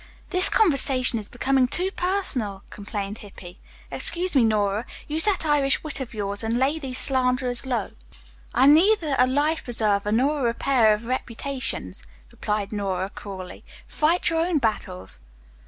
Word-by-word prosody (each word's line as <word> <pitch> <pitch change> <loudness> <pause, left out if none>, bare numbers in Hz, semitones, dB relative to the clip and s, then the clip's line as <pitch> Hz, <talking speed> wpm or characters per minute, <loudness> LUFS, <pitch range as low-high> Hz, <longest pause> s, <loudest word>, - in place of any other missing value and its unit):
"This 365 0 +5
conversation 270 - +3
is 210 - -6
becoming 265 +1 +1
too 365 +8 -2
personal," 290 - -1
complained 205 0 -6
Hippy. 190 -3 -12 0.3
"Excuse 355 -1 +1
me, 260 - +5
Nora, 210 0 0 0.2
use 315 +2 +2
that 390 -5 +1
Irish 290 -2 +1
wit 310 -2 -6
of 250 -4 -7
yours 205 0 -3
and 225 +1 -1
lay 275 +5 +1
these 260 -4 -5
slanderers 255 -1 +1
low." 250 -2 -2 0.6
"I 255 - +2
am 285 +2 +8
neither 335 -2 +3
a 250 - +5
life 295 +5 0
preserver 210 -4 0
nor 275 +7 +1
a - - -2
repairer 235 -2 +2
of 215 +2 -10
reputations," 245 - -4 0.3
replied 210 0 -3
Nora 195 -2 -3
cruelly. 190 -3 -9 0.2
"Fight 325 +4 +1
your 325 0 +1
own 345 -2 0
battles." 95 - -3
250 Hz, 155 wpm, -24 LUFS, 210-295 Hz, 0.6 s, am